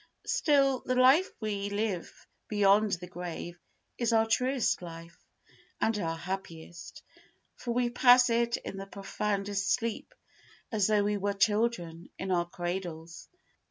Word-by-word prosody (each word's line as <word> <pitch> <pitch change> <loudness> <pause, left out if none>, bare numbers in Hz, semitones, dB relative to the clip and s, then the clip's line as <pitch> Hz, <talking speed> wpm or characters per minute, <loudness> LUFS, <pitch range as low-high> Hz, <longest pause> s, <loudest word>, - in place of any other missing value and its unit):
Still, 275 -4 +3
the 255 - -1
life 265 +9 +5
we 205 -2 -3
live 205 -3 -3 0.2
beyond 205 0 +3
the 180 0 -3
grave 175 0 -7 0.4
is 235 -1 +1
our 225 0 +4
truest 250 +1 +1
life, 170 0 -10 0.6
and 225 - +1
our 165 -3 -2
happiest, 170 -2 -7 0.5
for 240 - -4
we 245 -1 +1
pass 245 0 +6
it 235 0 +1
in 195 - -7
the 195 0 -7
profoundest 200 0 -2
sleep 230 -2 -2 0.6
as 210 -4 +2
though 210 -1 +3
we 205 0 0
were 200 +1 -1
children 200 -5 0
in 190 0 -4
our 175 -1 +1
cradles. 175 -2 -5
200 Hz, 135 wpm, -29 LUFS, 180-230 Hz, 0.6 s, pass